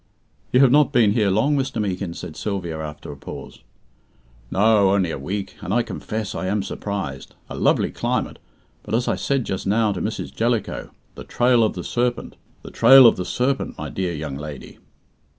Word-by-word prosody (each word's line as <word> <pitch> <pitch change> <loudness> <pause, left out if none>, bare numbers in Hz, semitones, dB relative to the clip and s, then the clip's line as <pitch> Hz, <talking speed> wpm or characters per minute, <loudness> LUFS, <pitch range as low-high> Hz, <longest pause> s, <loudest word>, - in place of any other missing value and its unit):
"You 125 - +5
have 135 -3 +6
not 145 0 +4
been 115 -4 +4
here 105 -2 +2
long, 110 +10 +2
Mr. 135 -4 -2
Meekin," 95 -4 -3
said 75 - -8
Sylvia, 90 -5 -4
after 75 -1 -7
a - - -8
pause. 70 - -10 0.9
"No, 105 0 +4
only 95 -3 +1
a - - -5
week; 95 +8 -4
and - - -5
I 120 +3 +2
confess 110 -3 -5
I 95 - -3
am 100 +1 0
surprised. 95 -11 -5 0.2
A - - -5
lovely - - +2
climate, - - -2 0.4
but, 105 - -3
as 120 +1 0
I - - +2
said 135 -4 -1
just 95 0 -4
now 105 +1 +2
to 95 -3 -4
Mrs. - - -4
Jellicoe, - - -1 0.2
the - - -9
Trail 120 -1 +3
of 110 - +1
the 90 - -5
Serpent 120 0 -2 0.3
the - - -10
Trail 130 +3 +8
of 115 - +7
the 90 - -4
Serpent 130 +6 -1
my - - -5
dear 90 -3 -3
young 75 -3 -5
lady." 75 -2 -9
100 Hz, 190 wpm, -22 LUFS, 90-120 Hz, 0.9 s, Trail